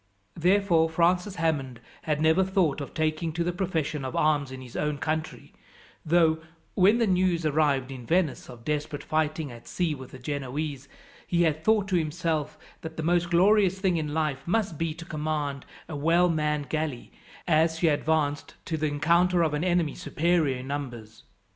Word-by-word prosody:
Therefore 175 -2 +3
Francis 180 +4 +1
Hammond 145 -7 -1 0.2
had 150 -1 -1
never 160 +4 +4
thought 185 -6 +1
of 140 - -6
taking 155 +1 -1
to 170 +1 -1
the 175 +1 -1
profession 160 -6 -2
of 130 - -5
arms 145 -3 +1
in 130 - -7
his 125 -2 -11
own 150 -1 -1
country; 155 +2 -4 0.5
though, 160 -1 +3 0.3
when 200 +4 +4
the 235 - +2
news 180 -4 +1
arrived 145 -3 +1
in 125 -3 -9
Venice 170 -4 0
of 120 -2 -12
desperate 150 -1 -2
fighting 155 -2 -1
at 120 0 -12
sea 175 -4 -1
with 130 -3 -9
the - - -11
Genoese, 140 +1 -4 0.4
he 175 -1 +2
had 155 -1 0
thought, 215 -2 +3
to 185 - +2
himself, 155 -2 -2 0.2
that 160 0 -8
the 160 - -3
most 175 +1 +1
glorious 190 +2 +4
thing 190 -3 +1
in 150 -2 -2
life 150 -3 -1
must 200 -2 0
be 165 -2 -1
to 165 0 -9
command 150 -3 -3 0.2
a 160 - -6
well 165 +5 +3
manned 150 -3 0
galley, 155 -5 -3 0.4
as 160 0 +3
she 165 - +2
advanced 150 -1 0
to 160 - -2
the 155 0 0
encounter 170 +4 +3
of 155 -2 0
an 150 +2 -1
enemy 175 -5 +1
superior 160 -4 0
in 125 +1 -8
numbers. 120 -6 -6
160 Hz, 180 wpm, -27 LUFS, 145-175 Hz, 0.5 s, never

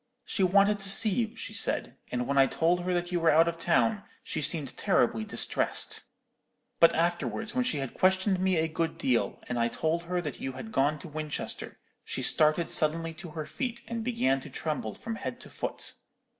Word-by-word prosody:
She - - -2
wanted 200 +2 +4
to 195 0 +3
see 215 +2 +7
you, 225 +2 -1
she - - -7
said; - - -1 0.2
and 125 0 -1
when 140 - -1
I 135 -1 +6
told 170 +5 +1
her 185 - 0
that 175 0 -2
you 175 - 0
were 165 -1 +3
out 160 +2 +5
of 170 0 -3
town, 200 +5 +2 0.2
she 155 - -3
seemed 150 -3 +1
terribly 115 -2 +1
distressed. - - +1 0.7
But 165 - +6
afterwards, 175 +6 -1
when 255 - +1
she 250 -11 0
had 135 -3 -4
questioned 190 +1 +2
me 185 -1 +1
a 160 0 +1
good 160 +1 -2
deal, 125 -3 0
and 125 -1 -2
I 115 - +2
told 165 +7 -2
her 180 +1 -1
that 150 -7 -6
you 135 - -4
had 220 +12 -8
gone 145 0 +1
to 170 - -10
Winchester, 155 -1 -4 0.3
she - - -4
started 155 +2 +3
suddenly 165 +1 +1
to 170 +2 -10
her 155 -1 -5
feet, 245 - -4
and 230 -1 -4
began 135 - +1
to 150 - -10
tremble 135 -6 -4
from 225 0 -6
head - - -5
to - - -12
foot. - - -2
165 Hz, 205 wpm, -28 LUFS, 150-190 Hz, 0.7 s, see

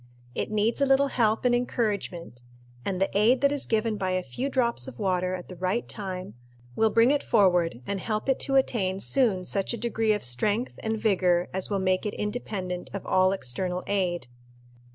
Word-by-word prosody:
It - - -3
needs 215 +5 +1
a 280 - +4
little 275 +1 +4
help 225 -2 +1
and 245 - +4
encouragement; 205 - -2 0.4
and 190 -2 -2
the 195 - 0
aid 235 +5 +4
that 280 0 +4
is 290 -1 -1
given 220 -1 0
by 185 -2 -1
a 185 0 0
few 250 - -3
drops 235 - 0
of 120 - -9
water 185 -1 0
at 180 - -8
the 180 - -9
right 185 +6 -1
time 185 - -6 0.4
will 225 - +3
bring 230 +4 +4
it 290 -1 +2
forward 175 - +2
and 200 -1 -2
help 215 +4 -3
it 270 - +2
to 270 - 0
attain 195 -8 +1
soon 215 -5 +2
such 195 +5 -1
a - - -7
degree 225 -1 +1
of 210 - -3
strength 205 - -1
and 220 0 -1
vigor 180 -5 +2
as 190 0 -2
will 200 - 0
make 185 +2 +1
it 210 - -4
independent 200 -5 -4
of 200 - -5
all 185 0 +3
external 180 +3 -2
aid. 180 -7 -1
200 Hz, 195 wpm, -27 LUFS, 185-230 Hz, 0.4 s, a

